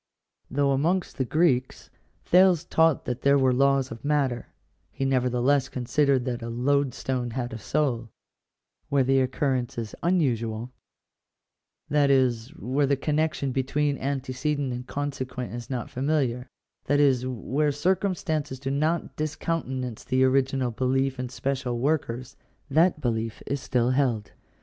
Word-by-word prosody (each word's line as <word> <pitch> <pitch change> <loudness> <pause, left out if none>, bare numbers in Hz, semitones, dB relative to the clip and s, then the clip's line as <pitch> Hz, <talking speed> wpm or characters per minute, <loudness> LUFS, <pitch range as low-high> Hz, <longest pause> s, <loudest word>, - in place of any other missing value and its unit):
Though, 140 +1 +1
amongst 170 +7 0
the 130 - +1
Greeks, 130 -3 +1 0.3
Thales 180 -2 +5
taught 160 -3 +2
that 125 0 -3
there 140 0 +4
were 130 -2 +3
laws 135 0 +2
of 115 - -8
matter, 140 -5 0 0.4
he 135 - -3
nevertheless 130 +1 +2
considered 130 +1 +1
that 125 -2 -3
a 115 - -5
load 135 +3 +1
stone 125 -2 -2
had 120 0 -4
a 115 - -6
souL 120 -4 -1 0.8
Where 140 -2 +3
the 135 +1 +3
occurrence 130 -2 -1
is 115 -2 -4
unusual 120 -9 0 0.6
— - - -54
that 145 -1 +4
is, 125 -4 +2
where 135 +3 0
the 140 - +3
connection 150 -1 0
be 130 - +1
tween 145 +2 0
antecedent 135 0 -2
and 125 +1 -6
consequent 130 -4 -4
is 120 0 -7
not 125 -3 -4
familiar 130 -3 -1 0.2
— - - -53
that 145 +1 +2
is, 130 -3 +3
where 135 +4 0
circumstances 155 -3 -1
do 135 0 -3
not 155 +4 0
discountenance 135 -6 -3
the 130 +1 +2
original 130 -1 +2
belief 130 +2 0
in 125 -1 -3
spe 135 +2 -1
cial 125 -3 -3
workers, 130 -3 -1 0.4
that 160 +2 +3
belief 115 -3 -2
is 140 -1 -2
still 125 -1 +1
held. 125 -6 0
135 Hz, 150 wpm, -26 LUFS, 125-145 Hz, 0.8 s, Thales